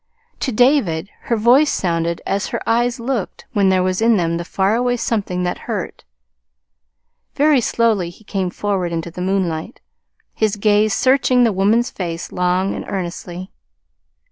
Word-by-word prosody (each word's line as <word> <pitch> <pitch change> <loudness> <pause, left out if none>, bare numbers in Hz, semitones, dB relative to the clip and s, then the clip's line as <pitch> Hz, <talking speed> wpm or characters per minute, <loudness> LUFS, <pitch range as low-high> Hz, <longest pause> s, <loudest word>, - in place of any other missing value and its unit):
To 265 - -1
David 215 - +2
her 235 - 0
voice 250 +7 +4
sounded 170 -2 -1
as 200 +1 -1
her - - -4
eyes 240 +2 +1
looked 235 -4 -3
when 200 -2 +3
there 185 -1 +3
was 185 +2 -1
in 230 -1 +4
them 170 -2 0
the 170 - -4
far 190 +3 0
away 245 +1 +1
something 195 -6 -2
that 180 - -2
hurt. - - -4 1.3
Very 290 -2 +4
slowly 220 -6 +1
he 175 +5 -16
came 190 -3 -2
forward 190 -2 -2
into 165 0 -4
the 180 - -7
moonlight, 185 0 -2 0.5
his 215 -1 0
gaze 210 0 +2
searching 255 -1 +3
the 230 -3 +3
woman's 210 +6 +2
face 170 -3 -5
long 180 +1 0
and - - -5
earnestly. 180 0 -5
200 Hz, 155 wpm, -19 LUFS, 180-235 Hz, 1.3 s, voice